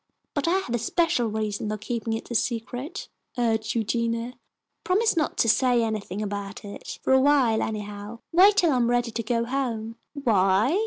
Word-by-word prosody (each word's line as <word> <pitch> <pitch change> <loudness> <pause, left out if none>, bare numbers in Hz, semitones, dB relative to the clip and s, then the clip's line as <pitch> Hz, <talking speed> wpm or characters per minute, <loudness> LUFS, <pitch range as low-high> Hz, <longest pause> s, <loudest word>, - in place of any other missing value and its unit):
"But 285 +1 -1
I 340 - +3
have 385 -11 -3
a 240 - +1
special 245 0 +1
reason 215 -1 -2
for 215 - -2
keeping 225 +1 -3
it 225 +2 -5
a - - -1
secret," 245 - -3 0.3
urged 225 -2 0
Eugenia. 230 +1 -1 0.5
"Promise 430 +5 +2
not 315 -2 0
to - - +3
say 245 +1 +3
anything 215 -2 -3
about 200 0 -5
it 205 - -8
for - - +3
awhile 265 -4 +4
anyhow. 210 +1 -5
Wait 390 +4 +6
till 345 -5 +4
I 260 - +2
am 240 -1 +2
ready 245 -1 +1
to 230 - -3
go 230 +1 0
home." 235 -3 -3 0.2
"Why?" 220 - +3
230 Hz, 175 wpm, -25 LUFS, 215-265 Hz, 0.5 s, Wait